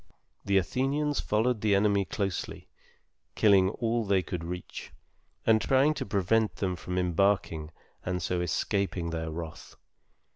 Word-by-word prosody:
The 100 0 +2
Athenians 140 - 0
followed 110 +1 0
the 105 -2 +3
enemy 100 -1 +2
closely, 95 -1 -4 0.7
killing 100 -3 +5
all 115 +2 -1
they 100 -3 +2
could 85 0 -5
reach, 90 +1 -7 0.5
and 110 -1 +4
trying 135 +3 +3
to - - -5
prevent 100 +3 +1
them 95 -2 -2
from 90 +1 -5
embarking 90 -3 +1 0.3
and 90 0 -2
so 90 +1 -1
escaping 90 0 -1
their 80 -1 -3
wrath. 80 -1 -8
100 Hz, 135 wpm, -28 LUFS, 90-110 Hz, 0.7 s, killing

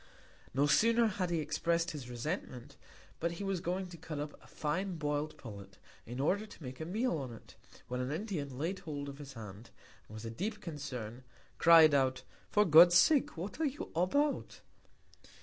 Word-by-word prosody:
No 140 +3 +2
sooner 230 +10 +4
had 185 -4 -1
he 170 - 0
express'd 170 +3 0
his 140 -5 -7
Resentment, 125 - -5 0.4
but 170 +1 -1
he 170 - -6
was 195 -2 -1
going 185 +2 -2
to 175 - -10
cut 160 -1 -7
up 145 +1 -4
a - - -18
fine 180 +5 -2
boil'd 150 0 -2
Pullet, 100 -5 -10 0.3
in 120 +3 -6
order 200 +10 +1
to 175 - -13
make 130 0 -7
a 160 - -4
Meal 215 -1 0
on't, 120 -5 -9 0.3
when 125 0 -3
an 125 +2 -2
Indian 155 - -4
laid 170 +7 -2
hold 145 -3 -5
of 140 0 -8
his 140 -2 -9
Hand, 110 -1 -10 0.4
and 110 - -10
with 115 +1 -7
deep 210 +3 -3
Concern, 130 - -6 0.4
cried 165 -2 +8
out, 130 -2 +2 0.3
For 210 0 +4
God's 175 +1 +8
Sake 270 - +4
what 190 - -5
are - - +3
you 285 0 -4
about? 285 - 0
155 Hz, 180 wpm, -33 LUFS, 135-185 Hz, 0.4 s, cried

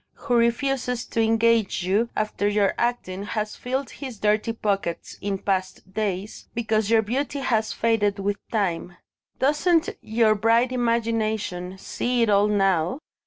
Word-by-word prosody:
who 245 - -1
refuses 245 +1 +1
to 230 - -1
engage 225 -3 +2
you 205 +6 +1
after 215 -1 -1
your 205 -1 +2
acting 235 -6 -2
has 210 +1 -3
filled 260 0 -3
his 260 -5 -7
dirty 210 +2 +1
pockets 200 -6 -2
in 200 -1 -1
past 190 -1 -3
days 205 -1 -3
because 220 -2 0
your 225 -1 +4
beauty 265 +6 -2
has 225 -5 0
faded 215 -3 +1
with 200 +1 -1
time. 180 -5 -1 0.4
Doesn't 320 +5 +2
your 220 0 +3
bright 230 +4 +3
imagination 220 -6 -1
see 245 +5 -1
it 220 - +2
all 200 +1 +4
now? 195 -1 +2
220 Hz, 140 wpm, -24 LUFS, 200-235 Hz, 0.4 s, your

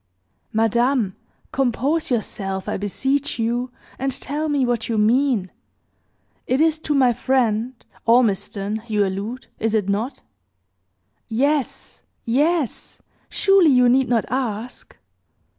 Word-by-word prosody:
"Madame, 225 -1 +1 0.4
compose 270 +5 0
yourself, 195 -5 -2
I - - -1
beseech 265 +9 -1
you, 240 +2 -1 0.3
and 270 +1 0
tell 295 +4 -3
me 285 -3 +2
what 240 -2 -1
you 225 - 0
mean. 225 -2 +2 1.0
It 255 - +1
is 320 0 +3
to 300 -2 -1
my 255 -3 +4
friend, 245 -1 0 0.3
Ormiston, 210 -2 +1
you 210 -2 +2
allude 205 +7 -4
is 225 0 0
it 205 -3 0
not?" 220 +7 -2 1.1
"Yes 275 +4 -1 0.2
yes! 290 +3 0 0.3
surely 390 -5 +4
you 250 -2 +5
need 255 0 +3
not 235 -3 +2
ask." 245 -2 -4
245 Hz, 115 wpm, -22 LUFS, 220-270 Hz, 1.1 s, you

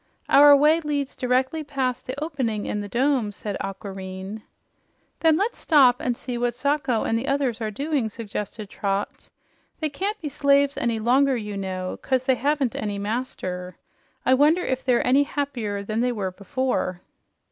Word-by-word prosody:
"Our 290 +1 +8
way 305 +3 +4
leads 290 -3 -2
directly 260 +5 0
past 265 -4 -2
the 260 +2 -4
opening 260 -9 -2
in 210 - -2
the 205 - -6
dome," 250 -2 +1
said 205 0 -5
Aquareine. 195 +1 -6 0.8
"Then 320 -1 +4
let's 425 +6 -1
stop 265 -6 +5
and 245 -2 -1
see 245 -1 -5
what 240 -1 0
Sacho 270 -3 0
and 225 - 0
the 265 - -5
others 270 -5 0
are 220 - -1
doing," 275 +1 -1
suggested 210 -1 -6
Trot. 200 0 -3 0.5
"They 310 - -1
can't 400 +8 -3
be 310 - -5
slaves 280 0 +3
any 235 -2 0
longer, 255 +4 +3
you 210 -2 -5
know, 185 -2 -4
'cause 260 -1 0
they 260 - +4
haven't 275 -1 0
any 205 -1 -3
master. 200 -4 -4 0.5
I 260 - +5
wonder 300 +7 +4
if 260 0 -2
they're 250 -2 +2
any 265 +3 +5
happier 250 -9 -2
than 215 +2 -2
they 250 0 +1
were 200 -5 -3
before?" 200 -2 -2
250 Hz, 170 wpm, -24 LUFS, 210-280 Hz, 0.8 s, Our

